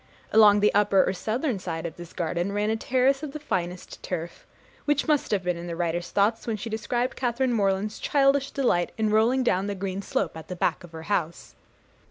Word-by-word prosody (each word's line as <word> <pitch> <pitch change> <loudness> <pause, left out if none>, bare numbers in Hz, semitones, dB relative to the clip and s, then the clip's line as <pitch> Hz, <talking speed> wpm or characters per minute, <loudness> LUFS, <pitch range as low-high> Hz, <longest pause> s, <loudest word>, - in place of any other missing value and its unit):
Along 210 -2 +7
the 210 - +4
upper 200 -2 +4
or - - +1
southern 225 - -2
side 165 -2 -5
of 165 - -5
this 175 -1 -10
garden, 175 +3 -2
ran 210 +1 0
a - - +1
terrace 260 +4 +1
of 300 -3 -6
the 305 - -5
finest 180 - -4
turf, 170 -1 -6 0.4
which 295 +1 +1
must 300 -2 +2
have 200 -3 0
been 180 -1 -1
in 170 +1 -7
the 170 - -4
writer's 175 +1 -2
thoughts 205 +6 +1
when 225 -2 -1
she 220 +2 -6
described 240 +3 -1
Catharine 245 0 0
Morland's 200 0 0
childish 275 -1 +2
delight 240 -11 +1
in 215 -1 +1
'rolling 235 +5 +3
down 195 -4 +1
the 205 - -3
green 195 0 -4
slope - - -2
at 160 - -9
the 180 - -5
back 175 - 0
of 175 - -11
the 160 0 -9
house.' 170 -3 -2
205 Hz, 215 wpm, -26 LUFS, 175-245 Hz, 0.4 s, Along